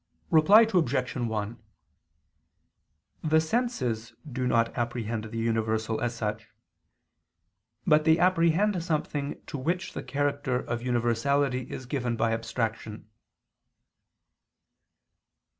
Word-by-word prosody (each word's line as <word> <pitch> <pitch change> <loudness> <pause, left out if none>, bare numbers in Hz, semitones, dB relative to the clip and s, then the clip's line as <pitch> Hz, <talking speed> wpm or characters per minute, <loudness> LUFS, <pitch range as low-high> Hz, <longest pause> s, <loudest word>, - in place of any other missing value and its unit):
Reply 175 +7 +7
Obj. 140 - +1
1: 110 -2 -3 1.6
The 160 0 +3
senses 130 - -1
do 130 -2 -2
not 115 -1 +2
apprehend 115 -2 -2
the 115 +1 -7
universal, 110 -1 0
as 120 -1 -1
such: 110 -1 -3 1.4
but 155 -1 +4
they 160 +1 +5
apprehend 180 +2 +2
something 150 -3 -2
to 145 - -6
which 175 +7 -2
the - - -4
character 145 -2 -1
of 120 -1 -2
universality 125 +2 0
is 130 - -6
given 125 -2 -2
by 115 0 +1
abstraction. 110 -1 -4
125 Hz, 100 wpm, -28 LUFS, 115-155 Hz, 1.6 s, Reply